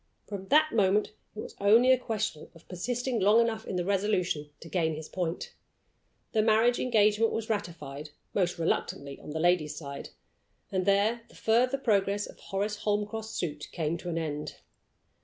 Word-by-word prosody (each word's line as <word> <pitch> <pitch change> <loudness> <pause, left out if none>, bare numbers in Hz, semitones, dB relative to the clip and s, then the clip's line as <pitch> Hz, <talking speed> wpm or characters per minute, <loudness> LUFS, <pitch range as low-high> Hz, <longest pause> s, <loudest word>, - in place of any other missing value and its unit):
From 195 -2 -7
that 310 +4 +4
moment 210 -1 +3 0.2
it 215 - -4
was - - -8
only 230 +6 +6
a 260 - +6
question 215 -9 -3
of 165 - -18
persisting 245 +6 -2
long 205 +4 +5
enough 225 -1 0
in - - -3
the 175 -1 -1
resolution 185 -6 0
to - - -11
gain 160 -2 0
his 155 0 -7
point. 175 -2 -3 0.8
The 220 - +3
marriage 225 +2 +4
engagement 220 -2 +3
was 225 0 -2
ratified 165 -8 -4 0.2
most 180 -3 +1
reluctantly 140 -4 -2
on - - -10
the 155 +2 -3
lady's 160 -3 +2
side 140 -2 -7 0.6
and 190 -1 -1
there 205 +4 +3
the - - -18
further 250 +4 +2
progress 205 -5 +1
of - - -13
Horace 205 +2 -2
Holmcroft's 210 +1 -2
suit 150 -3 -4
came 160 0 -1
to 175 - -6
an 165 - -2
end. 150 -2 -3
200 Hz, 170 wpm, -29 LUFS, 165-220 Hz, 0.8 s, only